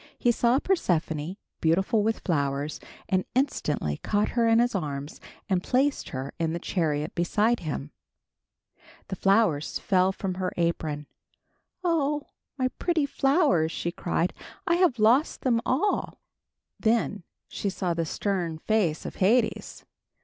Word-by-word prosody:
He 240 - +3
saw 235 +2 +3
Persephone, 175 - 0 0.2
beautiful 190 +7 +2
with 220 +2 0
flowers, 145 -3 -1 0.3
and 185 -1 +1
instantly 150 - 0
caught 210 0 0
her 235 -1 +2
in 225 0 +5
his 240 +1 +3
arms 145 -6 -4 0.3
and 185 -3 +1
placed 270 +7 +1
her 130 +1 -5
in 165 -1 0
the - - -1
chariot 155 -4 -1
beside 210 +7 +1
him. 75 - -5 1.2
The 190 - -3
flowers 195 -7 +2
fell 185 -1 +2
from 190 -1 -3
her 185 - -1
apron. 160 -3 -1 0.8
"Oh! 300 -4 +1 0.3
my 255 -1 +1
pretty 335 -4 +1
flowers," 270 - +2
she 170 - -3
cried, 170 0 -1 0.3
"I 340 -2 +2
have 350 -9 +3
lost 235 +7 +3
them 235 -3 +2
all." 320 +11 0 0.6
Then 220 -3 +1 0.3
she 200 - -3
saw 185 -2 -1
the 165 0 -1
stern 175 -3 -2
face 180 -3 0
of - - -6
Hades. 225 +6 +1
195 Hz, 135 wpm, -27 LUFS, 160-240 Hz, 1.2 s, in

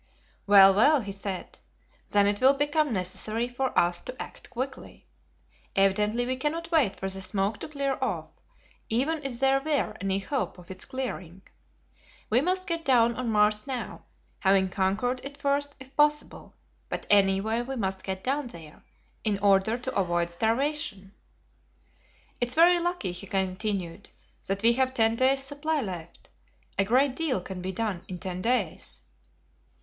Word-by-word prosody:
"Well, 195 -1 +8
well," 275 +8 +5
he 200 -2 -6
said, 195 -1 -6 0.5
"then 205 -1 +4
it 205 +2 +1
will 265 +2 +6
become 295 +1 +1
necessary 215 +4 -1
for 255 +2 -2
us 175 0 +3
to 255 - -8
act - - -8
quickly. 260 +2 -6 0.7
Evidently 210 +4 +2
we 255 +1 -2
cannot 330 +5 -3
wait 270 - +3
for 190 - -3
the 190 0 -4
smoke 195 +2 -1
to - - -6
clear 280 -3 -2
off, 180 -11 -2 0.6
even 290 +7 0
if 255 -3 -2
there 270 0 +3
were 290 0 -1
any 195 -1 0
hope 225 +6 -3
of 180 0 -12
its 185 - -5
clearing. 195 -9 -6 0.9
We 240 +4 +4
must 370 +4 0
get 335 -3 -1
down 235 -5 +4
on 250 -2 -3
Mars 210 +1 +2
now, 260 -2 -5 0.4
having 190 -1 +3
conquered 200 +8 0
it 280 +1 -8
first 285 0 0
if 265 +1 -14
possible, 295 0 0 0.3
but - - -4
anyway 200 +3 +3
we 265 +2 -5
must 190 -5 -3
get 190 -1 -4
down 275 +1 -1
there, 165 -8 -13 0.4
in 210 -2 +1
order 200 +2 +3
to 260 +1 -6
avoid 175 -2 0
starvation." 225 - -1 1.3
"It 245 - +1
is 245 - -4
very 345 +2 +6
lucky," 345 - -2
he 180 +3 -6
continued, 190 -1 -3 0.4
"that 195 +2 -2
we 235 +1 +6
have 260 +1 0
ten 225 -1 +3
days' 265 +2 +3
supply 290 +3 -2
left. 180 -8 -7 0.5
A - - +6
great 255 +6 +2
deal 310 -9 0
can 180 0 -7
be 185 +1 -3
done 205 -4 -3
in 185 - -6
ten 185 0 -5
days." 185 - -2
225 Hz, 160 wpm, -27 LUFS, 195-270 Hz, 1.3 s, Well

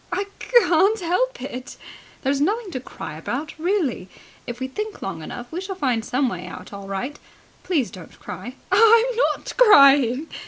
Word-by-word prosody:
"I 380 +3 0 0.2
c - - -9 0.2
can't 390 +6 +3
help - - -1
it!" 255 +2 -7 0.5
"There's 275 +1 0
nothing 410 +5 0
to 260 - -4
cry 155 -10 -8
about, 280 - -4
really! 325 - -1 0.4
If 240 0 -6
we 260 - -3
think 425 +10 -6
long 185 -4 -5
enough, 245 +9 -8
we 345 +3 -4
shall 385 0 -5
find 250 -9 0
some 255 +4 0
way 180 -6 -5
out - - -10
all 200 -1 -8
right. 225 +9 -4 0.4
Please 310 -10 -1
don't 180 -4 -12
cry." 195 +9 -8 0.2
"I'm 455 +1 +6 0.3
not - - -9
crying!" 280 - +6
280 Hz, 170 wpm, -22 LUFS, 240-380 Hz, 0.5 s, I'm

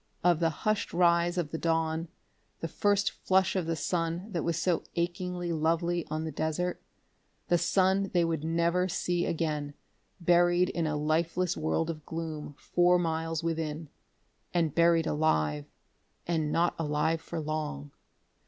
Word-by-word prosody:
Of 175 -2 +4
the 165 -1 +3
hushed 215 +6 -1
rise 170 0 +3
of 160 -4 -1
the 160 - -3
dawn, 165 0 0 0.5
the 165 - -3
first 205 +4 +1
flush 190 +1 +1
of 180 -4 -1
the 165 - 0
sun 170 +5 -2
that 170 -5 -2
was 170 -2 0
so 175 0 +1
achingly 175 0 -2
lovely 165 +2 0
on 155 +1 -2
the 160 - -3
desert. 160 +5 -2 0.7
The 175 - +4
sun 190 +3 +2
they 175 -2 +3
would 165 -2 -2
never 170 +3 +1
see 175 -1 -1
again, 150 -3 -2 0.4
buried 175 +1 +4
in 165 -2 -1
a 155 -1 -1
lifeless 165 +4 0
world 160 +1 0
of 155 -2 -9
gloom 155 -3 -5
four 175 0 +3
miles 165 -1 -1
within.... 160 -2 -3 0.7
And 165 -4 +2
buried 170 -1 +4
alive 75 - +1 0.6
and 160 -3 0
not 170 +2 +2
alive 160 +1 0
for 170 - -5
long.... 150 - -4
165 Hz, 150 wpm, -29 LUFS, 155-175 Hz, 0.7 s, Of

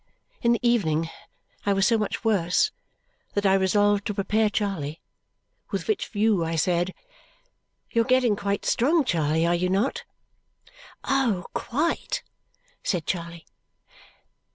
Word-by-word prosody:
In 235 - +3
the 240 +1 0
evening 165 -9 +1 0.5
I 200 - +2
was 195 -1 +2
so 230 - +4
much 215 +1 -2
worse 205 - +2 0.6
that 205 0 0
I 190 - +5
resolved 205 +1 +2
to 210 - -3
prepare 215 +2 +1
Charley, 180 -8 -2 0.7
with - - -3
which 430 - 0
view 210 -4 +1
I 165 0 -2
said, 175 +2 0 1.0
"You're 230 -1 +3
getting 255 -4 +3
quite 200 0 -2
strong, 295 +5 +3
Charley, 160 - +1
are 170 - +2
you 180 +1 0
not?' 200 +8 0 1.0
"Oh, 240 -10 +1
quite!" 300 +8 -1 0.6
said 175 -6 -1
Charley. 170 -2 -4
200 Hz, 130 wpm, -25 LUFS, 175-230 Hz, 1.0 s, I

